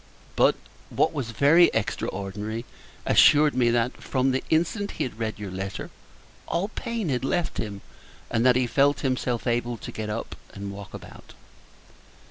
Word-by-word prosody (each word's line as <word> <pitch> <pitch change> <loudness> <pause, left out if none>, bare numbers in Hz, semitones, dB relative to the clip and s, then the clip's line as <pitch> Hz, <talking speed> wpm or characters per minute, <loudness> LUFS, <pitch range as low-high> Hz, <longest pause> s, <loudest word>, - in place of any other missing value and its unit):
But, - - +4 0.3
what - - +1
was 130 -5 -3
very 145 +9 +5
extraordinary, 105 +1 -3 0.4
assured 150 0 +6
me 125 -2 +3
that, 120 +1 0
from 130 0 +1
the 130 - -1
instant 175 +6 0
he - - 0
had 115 -3 -6
read 110 -1 -2
your 105 -3 -6
letter, 95 +1 -5 0.6
all 180 +5 -1
pain 230 -4 -3
had 130 -2 -1
left 170 +5 -1
him, 100 -3 -4 0.5
and 115 - +1
that 125 -1 +5
he 130 0 +2
felt 140 +4 +2
himself 125 -3 -1
able 120 -1 0
to - - -8
get 110 -1 -5
up 105 - -4 0.2
and 100 0 -5
walk 100 -3 -9
about. - - -12
120 Hz, 160 wpm, -25 LUFS, 110-140 Hz, 0.6 s, assured